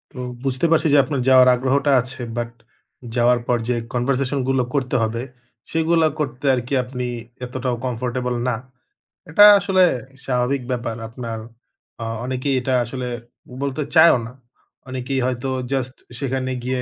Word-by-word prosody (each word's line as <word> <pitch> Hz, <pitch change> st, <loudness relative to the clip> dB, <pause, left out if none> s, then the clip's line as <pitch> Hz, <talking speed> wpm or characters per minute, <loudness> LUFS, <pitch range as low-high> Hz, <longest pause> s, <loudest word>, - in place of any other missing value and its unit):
হুম। 125 Hz, -1 st, -5 dB, 0.2 s
বুঝতে 130 Hz, +3 st, 0 dB
পারছি 165 Hz, 0 st, +4 dB
যে -, -, +7 dB
আপনার 140 Hz, -2 st, -2 dB
যাওয়ার 130 Hz, -1 st, +7 dB
আগ্রহটা 135 Hz, +3 st, +1 dB
আছে। 130 Hz, +2 st, -9 dB, 0.2 s
বাট 120 Hz, 0 st, -2 dB, 0.7 s
যাওয়ার 120 Hz, 0 st, +4 dB
পর 120 Hz, -, +2 dB
যে 125 Hz, -, +2 dB, 0.2 s
কনভারসেশনগুলো 130 Hz, +1 st, 0 dB
করতে 130 Hz, -3 st, 0 dB
হবে 115 Hz, +1 st, -2 dB, 0.5 s
সেগুলা 165 Hz, 0 st, +3 dB
করতে 135 Hz, -2 st, -3 dB
আরকি 125 Hz, +2 st, -4 dB
আপনি 125 Hz, 0 st, -5 dB, 0.4 s
এতটাও 125 Hz, 0 st, -2 dB
কমফোর্টেবল 125 Hz, 0 st, -2 dB
না। 125 Hz, -, +1 dB, 0.7 s
এটা 205 Hz, +7 st, +8 dB
আসলে 190 Hz, -1 st, +3 dB, 0.4 s
স্বাভাবিক 125 Hz, +1 st, 0 dB
ব্যাপার 120 Hz, -2 st, -2 dB
আপনার 115 Hz, -1 st, -6 dB, 0.6 s
অ্যা 115 Hz, -, -4 dB, 0.2 s
অনেকেই 130 Hz, +2 st, -1 dB
এটা 130 Hz, +1 st, -1 dB
আসলে 125 Hz, +1 st, -5 dB, 0.5 s
বলতে 140 Hz, +1 st, -2 dB
চায়ও 160 Hz, -3 st, +7 dB
না। -, -, -10 dB, 0.6 s
অনেকেই 130 Hz, +1 st, -2 dB
হয়তো 130 Hz, +1 st, -2 dB, 0.2 s
জাস্ট 130 Hz, -1 st, -2 dB, 0.2 s
সেখানে 130 Hz, -1 st, -2 dB
গিয়ে 130 Hz, 0 st, -1 dB
130 Hz, 140 wpm, -21 LUFS, 125-135 Hz, 0.7 s, এটা